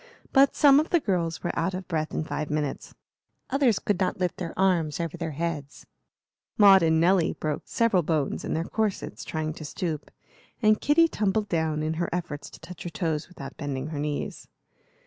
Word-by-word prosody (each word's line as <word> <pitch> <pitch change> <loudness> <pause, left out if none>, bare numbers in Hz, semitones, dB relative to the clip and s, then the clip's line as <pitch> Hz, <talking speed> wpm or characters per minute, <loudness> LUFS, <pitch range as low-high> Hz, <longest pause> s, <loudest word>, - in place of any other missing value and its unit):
But 275 +1 +5
some 280 -1 +7
of 310 - -1
the 345 - +4
girls 175 - -1
were 175 - 0
out 190 - -1
of 185 0 -6
breath 155 -3 -2
in - - -2
five 155 -1 -4
minutes; 150 -2 -3 0.6
others 260 -6 +3
could 205 -3 -1
not 185 -1 0
lift 180 -2 -1
their 170 -3 -6
arms 175 -6 +2
over 170 -1 -3
their 165 -1 -4
heads; 155 -4 -4 0.7
Maud 195 -2 +8
and 160 -1 +3
Nelly 175 0 +3
broke 150 -1 -4
several 230 -6 +2
bones 155 -3 -1
in - - -2
their 160 - 0
corsets, 215 +2 -2
trying 155 -1 -3
to 155 - -9
stoop; 155 0 -4 0.5
and 215 -2 +3
Kitty 330 +3 +5
tumbled 210 -5 -1
down, 160 -2 0
in 155 +1 -1
her 170 - -1
efforts 155 -5 -4
to - - -14
touch 180 -1 -11
her 175 - -4
toes 165 -3 -2
without 140 -6 -10
bending 140 0 -4
her 150 -2 -4
knees. 150 0 -4
170 Hz, 190 wpm, -26 LUFS, 155-195 Hz, 0.7 s, Maud